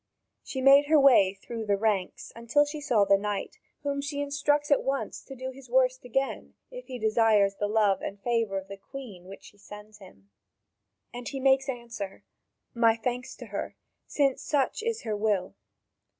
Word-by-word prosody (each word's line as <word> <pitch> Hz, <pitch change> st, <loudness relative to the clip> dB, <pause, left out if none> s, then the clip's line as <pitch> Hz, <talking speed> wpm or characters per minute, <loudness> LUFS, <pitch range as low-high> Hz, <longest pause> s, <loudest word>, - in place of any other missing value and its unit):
She 265 Hz, -, -5 dB
made 275 Hz, +2 st, +6 dB
her 310 Hz, 0 st, +5 dB
way 230 Hz, -9 st, +5 dB
through 220 Hz, +2 st, -7 dB
the 200 Hz, -1 st, +2 dB
ranks 200 Hz, -3 st, -2 dB
until 235 Hz, +6 st, +2 dB
she 295 Hz, +1 st, -6 dB
saw 240 Hz, -8 st, +2 dB
the 195 Hz, 0 st, +4 dB
knight, 205 Hz, -1 st, -4 dB, 0.2 s
whom 280 Hz, -1 st, -1 dB
she 285 Hz, 0 st, -4 dB
instructs 290 Hz, +1 st, 0 dB
at 285 Hz, -, +5 dB
once 275 Hz, 0 st, -3 dB
to 270 Hz, -, -11 dB
do 260 Hz, +1 st, -6 dB
his 260 Hz, -1 st, -14 dB
"worst" 255 Hz, 0 st, +2 dB
again, 270 Hz, +3 st, -3 dB, 0.2 s
if -, -, -9 dB
he 255 Hz, -, -6 dB
desires 215 Hz, -3 st, +3 dB
the 205 Hz, -, -1 dB
love 205 Hz, -3 st, +2 dB
and 200 Hz, -, -6 dB
favour 230 Hz, -3 st, 0 dB
of 190 Hz, 0 st, -6 dB
the 195 Hz, -, -8 dB
Queen 210 Hz, -5 st, -10 dB
which 195 Hz, -, -11 dB
she 205 Hz, -, -16 dB
sends 210 Hz, +1 st, -12 dB
him. 100 Hz, -, -17 dB, 0.8 s
And 245 Hz, 0 st, -6 dB
he 270 Hz, -, -5 dB
makes 270 Hz, +1 st, +3 dB
answer: 235 Hz, -6 st, -6 dB, 0.5 s
"My 230 Hz, -1 st, +4 dB
thanks 245 Hz, +2 st, -4 dB
to -, -, -10 dB
her, -, -, -4 dB, 0.3 s
since 275 Hz, -3 st, +1 dB
such 280 Hz, +3 st, 0 dB
is 460 Hz, 0 st, -3 dB
her 220 Hz, -2 st, -2 dB
will." 205 Hz, -3 st, 0 dB
235 Hz, 180 wpm, -27 LUFS, 205-275 Hz, 0.8 s, made